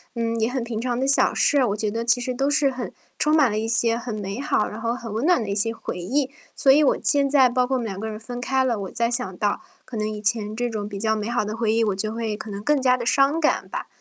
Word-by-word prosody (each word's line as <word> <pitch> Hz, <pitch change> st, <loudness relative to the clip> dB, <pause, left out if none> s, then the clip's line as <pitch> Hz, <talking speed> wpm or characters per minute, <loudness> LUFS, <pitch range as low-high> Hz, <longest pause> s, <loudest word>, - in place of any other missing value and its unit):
嗯， 230 Hz, 0 st, -1 dB
也 220 Hz, -, +2 dB
很 260 Hz, 0 st, -2 dB
平 230 Hz, -2 st, -4 dB
常 245 Hz, 0 st, -2 dB
的 270 Hz, -, 0 dB
小 275 Hz, -, +4 dB
事， 285 Hz, -3 st, +3 dB
我 200 Hz, -, -1 dB
觉 210 Hz, 0 st, -2 dB
得 230 Hz, +2 st, -3 dB
其 240 Hz, +1 st, +3 dB
实 255 Hz, 0 st, -2 dB
都 275 Hz, +3 st, 0 dB
是 290 Hz, -1 st, +3 dB
很 255 Hz, -1 st, -5 dB, 0.3 s
充 305 Hz, +1 st, +3 dB
满 275 Hz, -8 st, +4 dB
了 210 Hz, -, -2 dB
一 225 Hz, -, -2 dB
些 230 Hz, 0 st, +2 dB
很 235 Hz, -2 st, -5 dB
美 200 Hz, +2 st, -5 dB
好， 275 Hz, -6 st, 0 dB
然 215 Hz, -, -8 dB
后 230 Hz, 0 st, -1 dB
很 230 Hz, -3 st, -7 dB
温 225 Hz, +6 st, -2 dB
暖 350 Hz, -9 st, +3 dB
的 200 Hz, -, -6 dB
一 200 Hz, -, -1 dB
些 225 Hz, +2 st, +3 dB
回 -, -, -6 dB
忆。 260 Hz, +9 st, -1 dB, 0.2 s
所 270 Hz, -, +4 dB
以 295 Hz, +3 st, +5 dB
我 275 Hz, -, +3 dB
现在 275 Hz, -2 st, +3 dB
包 250 Hz, +1 st, +1 dB
括 265 Hz, -, 0 dB
我 -, -, -2 dB
们 235 Hz, -, -4 dB
两 195 Hz, -3 st, -5 dB
个 220 Hz, -, -4 dB
人 215 Hz, -, -6 dB
分 245 Hz, +2 st, -7 dB
开 265 Hz, +1 st, +1 dB
了， 240 Hz, -4 st, 0 dB
我 190 Hz, -, -6 dB
再 235 Hz, 0 st, 0 dB
想 235 Hz, -7 st, 0 dB
到， 205 Hz, -1 st, -1 dB, 0.2 s
可 240 Hz, -, -9 dB
能 215 Hz, 0 st, -1 dB
以 215 Hz, -, -5 dB
前 215 Hz, 0 st, +1 dB
这 245 Hz, +1 st, -1 dB
种 210 Hz, -2 st, -4 dB
比 200 Hz, -2 st, -6 dB
较 220 Hz, 0 st, +1 dB
美 210 Hz, +1 st, -3 dB
好 240 Hz, -3 st, 0 dB
的 215 Hz, +1 st, -4 dB
回 225 Hz, -1 st, 0 dB
忆， 225 Hz, 0 st, +2 dB
我 205 Hz, -3 st, 0 dB
就 215 Hz, +2 st, -2 dB
会 225 Hz, -2 st, -3 dB
可 220 Hz, -, -8 dB
能 200 Hz, 0 st, -6 dB
更 295 Hz, +2 st, +2 dB
加 255 Hz, -1 st, +3 dB
地 235 Hz, -, -5 dB
伤 275 Hz, +5 st, +3 dB
感 310 Hz, -, +1 dB
吧， -, -, -5 dB
230 Hz, 330 characters per minute, -23 LUFS, 215-260 Hz, 0.3 s, 以